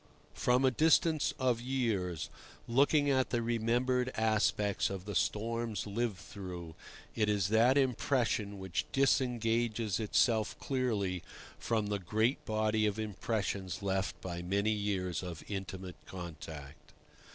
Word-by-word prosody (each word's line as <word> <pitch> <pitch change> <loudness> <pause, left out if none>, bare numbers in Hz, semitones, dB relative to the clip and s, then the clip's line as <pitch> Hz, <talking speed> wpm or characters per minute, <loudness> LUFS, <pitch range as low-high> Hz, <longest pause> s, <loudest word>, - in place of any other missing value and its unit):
From 125 - +2
a 130 - +5
distance 160 +2 +3
of 125 -4 +1
years, 110 - -1 0.4
looking 145 +4 +4
at 130 -1 +2
the 120 -1 0
remembered 120 +2 +1
aspects 110 -2 +1
of 95 -1 -5
the 105 - -4
storms 115 +1 -1
lived 110 0 -1
through, 90 -5 -8 0.4
it 105 -2 +1
is 100 -3 +1
that 115 +5 +5
impression 120 -5 +1
which 95 -2 -2
disengages 120 -5 +1
itself 110 0 +2
clearly 105 -9 -1 0.4
from 110 -2 0
the 105 0 -1
great 110 +7 0
body 110 0 +1
of 105 0 -1
impressions 100 -3 -2
left 95 -1 -1
by 85 -2 -4
many 100 +4 +1
years 100 -4 -1
of 85 -3 -7
intimate 95 -2 -5
contact. 80 -5 -9
110 Hz, 125 wpm, -33 LUFS, 95-120 Hz, 0.4 s, a